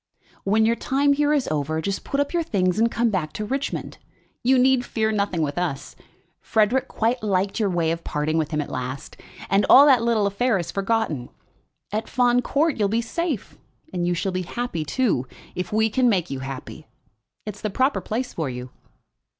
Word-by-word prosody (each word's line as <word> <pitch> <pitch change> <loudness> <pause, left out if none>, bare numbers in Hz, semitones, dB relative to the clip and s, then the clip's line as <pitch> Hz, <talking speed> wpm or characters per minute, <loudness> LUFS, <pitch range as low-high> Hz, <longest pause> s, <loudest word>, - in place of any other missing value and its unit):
"When 215 +3 +3
your 230 +1 +3
time 280 +3 +2
here 295 +1 +2
is 290 -4 +1
over, 155 +1 -1
just 195 +4 -3
put 275 - -2
up 285 +2 0
your 345 - +2
things 185 - 0
and 230 +1 +4
come 230 0 +1
back 160 -6 -2
to 215 - -4
Richmond. 270 +5 -3 0.4
You 260 +2 +4
need 255 0 +4
fear 220 -2 -1
nothing 200 -6 0
with 145 +3 -2
us. 160 -6 -3 0.4
Frederic 235 +4 +1
quite 235 +2 0
liked 195 0 0
your 210 -3 +2
way 170 -3 +1
of 165 0 -4
parting 155 +2 -1
with 155 - -1
him 150 -2 -1
at 145 - -7
last, 130 +1 -5 0.3
and 195 +1 +3
all 280 - +9
that 265 -5 +6
little 230 -3 +2
affair 210 +3 +1
is 175 - -4
forgotten. 195 - -1 0.6
At 215 +2 -3
Fawn 245 0 +3
Court 300 +4 +1
you'll 205 -2 +2
be 225 +3 +1
safe; 275 - -3 0.3
and 175 -1 -1
you 175 - +1
shall 190 +3 -1
be 185 0 -2
happy, 210 -3 -3
too, 155 - 0 0.3
if 180 -1 -4
we 220 +1 +3
can 245 +3 +2
make 180 -7 0
you 135 - -3
happy. 135 0 -8 0.6
It's 210 -1 -7
the 215 - -1
proper 260 +8 +1
place 245 +3 -3
for 160 -5 -2
you." 125 0 -7
210 Hz, 200 wpm, -23 LUFS, 170-245 Hz, 0.6 s, all